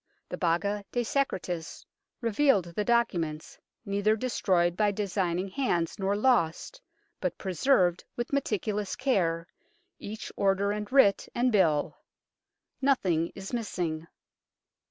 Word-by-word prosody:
The - - -3
Baga 200 +4 0
de 245 - 0
Secretis 185 - -2 0.4
revealed 225 - +2
the 210 - 0
documents, 175 -10 0 0.3
neither 205 +1 +2
destroyed 185 -7 +1
by 210 +1 +2
designing 190 -2 -1
hands 185 -8 -1
nor 195 +1 +1
lost, 240 - +1 0.4
but - - -2
preserved 185 -2 +2
with 240 +3 -4
meticulous 210 -6 -1
care, 175 -11 0 0.5
each 215 +1 -7
order 200 +1 +2
and 210 +2 -4
writ 255 -8 +4
and 250 +1 +2
bill. 165 -8 +2 0.8
Nothing 185 - +2
is 195 +4 -8
missing. 175 -8 -3
200 Hz, 115 wpm, -28 LUFS, 175-235 Hz, 0.8 s, writ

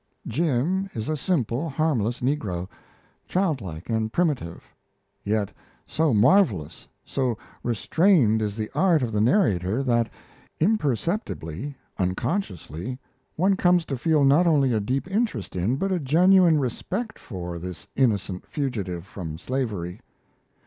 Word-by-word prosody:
Jim 165 - 0
is 110 +2 -3
a 155 - +1
simple, 145 - -1
harmless 135 -6 0
negro, 105 -10 -1 0.6
childlike 130 - -2
and 110 -1 -1
primitive; 135 - -1 0.6
yet, 105 -1 0 0.3
so 160 0 +1
marvellous, 110 - +3 0.2
so 125 -5 -1 0.2
restrained 120 - +3
is 105 0 -2
the 110 -1 -3
art 170 -7 +3
of 120 - -2
the 105 -1 +1
narrator, 110 - +2
that 120 -3 +2 0.5
imperceptibly, 145 - -1 0.2
unconsciously, 95 - -2 0.4
one 190 +4 +3
comes 175 -2 +3
to 135 - -3
feel 150 +3 +2
not 145 +6 +5
only 140 -6 +3
a 110 - +2
deep 130 - -1
interest 195 - -1
in, 95 +8 +1
but 195 +7 -1
a 185 - +1
genuine 170 +3 +5
respect 190 - -3
for, 90 -4 -6
this 90 +2 -8
innocent 100 -7 +1
fugitive 100 - -3
from 80 -5 -7
slavery. 100 -5 -3
125 Hz, 125 wpm, -25 LUFS, 100-165 Hz, 0.6 s, not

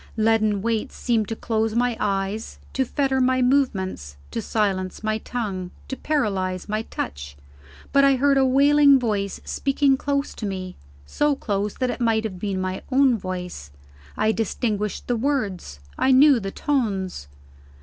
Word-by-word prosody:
Leaden 215 -2 +2
weights 225 -2 -1
seemed 225 -4 0
to 225 - -3
close 220 0 -1
my 245 0 +1
eyes, 195 +2 -2 0.2
to 265 - +1
fetter 265 0 0
my 255 0 +3
movements, 190 - 0
to - - -3
silence 195 -3 -1
my 215 0 0
tongue, 200 -7 -4 0.2
to 265 - -4
paralyze 195 -12 -1
my 215 +1 -1
touch. 70 - -6 0.6
But 280 0 +5
I 275 -1 +5
heard 275 +1 +3
a - - +4
wailing 280 +2 +5
voice, 205 -5 -2
speaking 275 0 +1
close 280 +1 -1
to 215 - -5
me, 185 -2 -5 0.3
so 295 - +1
close 205 -4 -2
that 255 -1 -1
it - - -6
might 225 -2 +2
have 190 -5 -5
been 195 -1 -2
my 185 0 -3
own 265 -1 +4
voice: 180 - -6 0.5
I 215 +1 +2
distinguished 210 -2 -2
the 245 - 0
words; 215 - -2 0.2
I - - +3
knew 265 0 +6
the 195 -2 -4
tones. 195 - -2
220 Hz, 160 wpm, -23 LUFS, 195-265 Hz, 0.6 s, knew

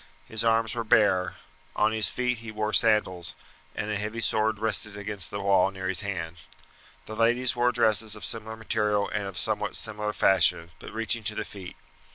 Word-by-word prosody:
His 110 0 -1
arms 115 -1 +2
were 120 -1 -3
bare; 105 -6 +3 0.4
on 110 - +2
his 110 -3 +1
feet 125 -2 -1
he 115 0 -9
wore 110 0 -2
sandals, 95 -5 +2 0.4
and 105 +1 -3
a 105 - -1
heavy 105 +2 -4
sword 110 -1 +1
rested 105 -1 -1
against 100 -1 -2
the 100 - -5
wall 100 -1 +3
near 95 -1 -6
his 95 -1 +1
hand. 90 -5 -4 0.7
The 110 - -7
ladies 120 +2 +2
wore 120 0 +2
dresses 110 -2 +2
of 105 - -5
similar 110 -1 -2
material 105 -2 0
and 105 -1 -3
of 95 -2 -7
somewhat - - -1
similar 105 -1 -2
fashion, 85 -4 +2
but - - -10
reaching 115 +1 -1
to 105 - 0
the 110 - -3
feet. 95 -3 -10
105 Hz, 190 wpm, -27 LUFS, 100-110 Hz, 0.7 s, bare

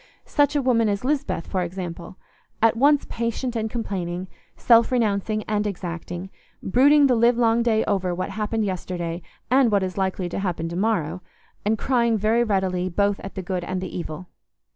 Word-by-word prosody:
Such 290 0 +2
a 285 - +1
woman 230 -4 +3
as 200 +3 -2
Lisbeth, 270 - -1
for 185 - -2
example—at 180 +5 -3
once 285 +4 +4
patient 235 +2 -3
and 220 -1 -1
complaining, 185 -6 -4 0.3
self 235 0 +5
renouncing 215 -3 0
and 210 0 -1
exacting, 175 -1 -6 0.3
brooding 285 +7 +5
the 260 - +4
livelong 235 0 +3
day 225 -2 +2
over 190 -3 0
what 185 - -3
happened 215 +1 -1
yesterday 175 -2 -4 0.3
and 260 -3 +4
what 200 -2 +2
is 185 +1 -3
likely 190 -1 -1
to - - -4
happen 175 -4 -2
to 170 - -5
morrow, 185 -4 0 0.4
and 220 +2 +1
crying 235 -2 +1
very 220 +3 +2
readily 190 -4 0
both 200 +2 +1
at 195 - -9
the 190 - -4
good 180 -1 -3
and 185 +1 -3
the 185 -1 -6
evil. 175 +1 -6
205 Hz, 170 wpm, -23 LUFS, 185-230 Hz, 0.4 s, self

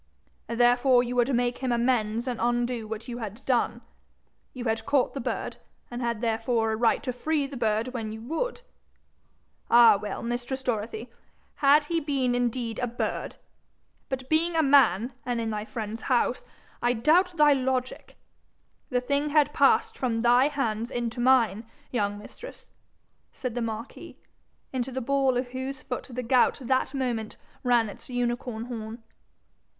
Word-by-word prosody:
'Therefore 245 +2 +4
you 245 0 -4
would 245 +2 +2
make 245 0 0
him 260 -2 -1
amends 235 -1 +1
and 245 -2 -3
undo 240 -1 0
what 220 +2 -6
you 240 -1 -5
had 220 +1 -7
done? 250 -3 +1 0.7
You 255 -1 -7
had 225 -1 0
caught 280 -3 +1
the 275 - -4
bird, - - -3 0.3
and 240 +1 -5
had 235 -2 -2
therefore 225 0 0
a - - 0
right 230 +1 +2
to 255 - -2
free 295 +3 0
the 275 0 -8
bird 225 0 0
when 225 -4 -4
you 220 - -7
would? 400 - -3 1.1
All 230 -4 +7
well, 205 -1 -5
mistress 245 +3 -3
Dorothy, 225 0 -3 0.5
had 290 +1 +5
he 330 +3 -1
been 275 -5 0
indeed 245 -1 -1
a 245 - 0
bird! 240 +1 -3 0.7
But 260 -1 -4
being 330 +3 +1
a 320 - +3
man, 255 -5 +4
and 245 -1 -2
in 225 -1 -2
thy 210 0 -3
friend's 220 0 -5
house, 250 -1 +1 0.4
I 240 0 +2
doubt 335 +9 +3
thy 300 -1 +6
logic. 260 -1 -2 0.7
The 250 -3 +1
thing 280 +3 0
had 295 -1 +3
passed 450 0 +3
from 230 -3 0
thy 245 +3 +5
hands 235 -6 -2
into 240 -1 -3
mine, 240 -4 +3 0.3
young 205 -4 -1
mistress,' 345 - -12 0.6
said 255 -3 -5
the 245 - -2
marquis, 225 +1 -6 0.6
into 260 0 -2
the 260 - -3
ball 270 0 +1
of 245 0 -2
whose 260 +1 -5
foot 250 - -4
the 250 +1 -4
gout 250 +1 +3
that 260 +2 0
moment 240 -5 -2 0.3
ran 240 -2 +3
its 205 - -11
unicorn 245 -1 -2
horn. 225 -1 -7
245 Hz, 160 wpm, -27 LUFS, 230-265 Hz, 1.1 s, All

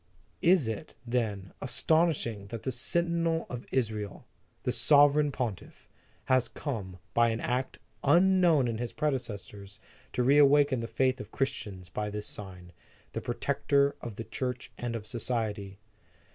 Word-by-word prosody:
Is 175 -7 +4
it, 110 -2 -5
then, 110 -6 -2
aston 165 +2 +3
ishing 115 -10 -4
that 115 0 -6
the 130 - -1
Sentinel 165 +5 0
of 120 -1 -6
Israel, 110 -5 -2 0.4
the - - +1
Sove 145 -1 +6
reign 150 -1 +2
Pontiff, 120 -7 -5 0.4
has 130 -1 +3
come, 100 -11 -5 0.2
by 115 0 +4
an 115 0 -1
act 125 +2 -2 0.3
unknown 175 -6 +5
in 115 -1 -2
his 120 -1 -3
predecessors, 105 -9 -4 0.3
to 125 - +1
reawaken 140 0 +5
the 115 - -3
faith 130 +1 +1
of 105 - -10
Christians, 100 -9 -3
by 105 +3 -3
this 105 0 -5
sign, 90 -3 -8 0.4
the - - -3
protector 140 0 +1
of 115 -4 -6
the 115 - -5
Church 125 +1 -4
and 120 -1 -4
of 110 -2 -5
society? 110 -4 -3
120 Hz, 145 wpm, -29 LUFS, 105-145 Hz, 0.4 s, Sove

